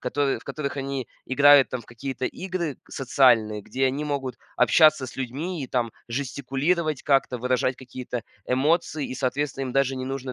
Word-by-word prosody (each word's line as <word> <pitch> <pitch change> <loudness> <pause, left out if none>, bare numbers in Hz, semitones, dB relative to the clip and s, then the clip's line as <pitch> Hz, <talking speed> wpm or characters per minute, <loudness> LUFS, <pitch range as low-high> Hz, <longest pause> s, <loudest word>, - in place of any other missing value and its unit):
которы 140 -5 0
в - - -18
которых 140 -2 -4
они 135 -1 -3 0.2
играют 140 +1 +6
там 130 - -3
в 115 - -16
какие-то 130 +2 -5
игры 180 -5 -3
социальные, 120 -6 +3
где 135 +5 0
они 140 +3 -1
могут 135 -4 -2 0.2
общаться 155 -4 +5
с - - -11
людьми 145 +6 -4
и 130 - -6
там 120 -3 -1 0.2
жестикулировать 140 +5 -1
как-то, 135 -3 +2
выражать 125 +1 0
какие-то 125 -2 -6 0.2
эмоции, 150 +3 +1
и, - - -6
соответственно, 135 +1 -2
им - - -5
даже 135 0 +2
не 130 0 -4
нужно 135 -1 -4
135 Hz, 170 wpm, -25 LUFS, 130-145 Hz, 0.2 s, играют